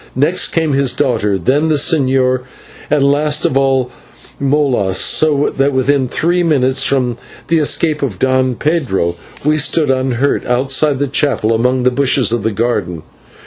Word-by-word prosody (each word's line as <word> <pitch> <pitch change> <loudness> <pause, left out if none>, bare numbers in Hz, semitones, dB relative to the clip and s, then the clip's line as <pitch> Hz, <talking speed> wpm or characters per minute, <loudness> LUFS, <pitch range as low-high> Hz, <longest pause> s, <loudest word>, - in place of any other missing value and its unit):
Next 150 +8 +1
came 160 -3 -1
his 135 -2 +1
daughter, 105 -5 0
then 135 - 0
the 155 - +1
Señor, 130 -4 +1 0.5
and 150 -2 +1
last 145 +2 +1
of - - 0
all, 135 -2 +1 0.5
Molas, 135 -9 0
so 145 -2 +2
that 135 +1 +1
within 130 0 +1
three 175 +7 0
minutes 135 -6 +1
from 125 -4 0 0.3
the 165 -1 +2
escape 155 0 0
of 125 -10 -3
Don 130 +1 0
Pedro 130 - -1 0.3
we 155 +1 +2
stood 150 -1 +1
unhurt 130 +1 -1
outside 135 +3 +1
the 145 - -1
chapel 135 -5 0
among 125 +3 0
the 125 - +2
bushes 130 -3 +1
of 120 -3 -2
a - - -1
garden. 100 -7 -3
135 Hz, 155 wpm, -14 LUFS, 125-145 Hz, 0.5 s, so